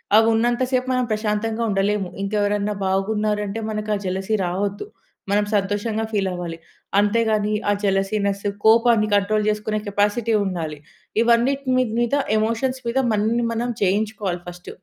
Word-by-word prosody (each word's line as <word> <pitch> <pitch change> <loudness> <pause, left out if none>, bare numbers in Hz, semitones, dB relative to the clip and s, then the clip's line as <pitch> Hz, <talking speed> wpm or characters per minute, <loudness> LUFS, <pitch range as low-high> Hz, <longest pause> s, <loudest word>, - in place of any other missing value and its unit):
అవి 220 +1 +6
ఉన్నంత 240 +2 +1
సేపు 255 0 +1
మనం 255 - +1
ప్రశాంతంగా 215 +1 -1
ఉండలేము. 195 -1 0 0.2
ఇంకెవరన్నా 205 0 0
బాగున్నారంటే 210 +2 -1
మనకు 215 0 -4
ఆ - - -1
జలసీ 190 +4 -1
రావొద్దు. 200 - -2 0.5
మనం 205 0 +2
సంతోషంగా 205 +3 -1
ఫీల్ 195 -3 0
అవ్వాలి. 175 -2 -5 0.4
అంతేగాని 215 0 +2 0.2
ఆ - - +4
జలసీనెస్, 200 +1 0 0.2
కోపాన్ని 225 -1 +5
కంట్రోల్ 210 +1 +1
చేసుకునే 215 0 -1
కెపాసిటీ 210 +3 +1
ఉండాలి. 165 -5 -3 0.4
ఇవన్నిటిని 255 +2 +2 0.2
మీద 240 +3 +1 0.2
ఎమోషన్స్ 230 +4 0
మీద 250 +3 +1
మనని 225 +3 +1
మనం 235 +2 -2
జయించుకోవాలి 200 -2 0
ఫర్స్ట్. 175 0 -9
210 Hz, 130 wpm, -22 LUFS, 200-225 Hz, 0.5 s, అవి